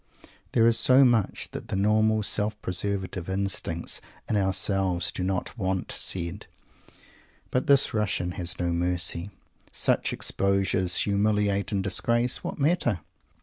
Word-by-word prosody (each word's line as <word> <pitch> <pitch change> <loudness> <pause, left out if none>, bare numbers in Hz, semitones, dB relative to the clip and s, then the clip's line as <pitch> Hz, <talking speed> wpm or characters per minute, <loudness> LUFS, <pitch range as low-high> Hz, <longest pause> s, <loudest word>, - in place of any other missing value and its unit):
There 115 - +4
is 115 -1 +5
so 130 +1 +7
much 115 -5 0
that - - -7
the - - -3
normal 110 +2 +2
self 105 +1 -1
preservative 95 -1 -3
instincts 95 -3 -3 0.3
in - - -1
ourselves 95 -2 +1
do - - -5
not 95 +2 -2
want 95 -1 -2
said. 90 +2 -3 1.0
But 125 - -1
this 140 -1 +4
Russian 100 -4 -1
has 90 0 -3
no 85 -1 -1
mercy. 85 +1 0 0.4
Such - - 0
exposures 95 -2 +1
humiliate 100 -1 +1
and 100 -2 -1
disgrace? 120 +5 +1
What - - -5
matter? 140 - +1
100 Hz, 130 wpm, -26 LUFS, 90-110 Hz, 1.0 s, so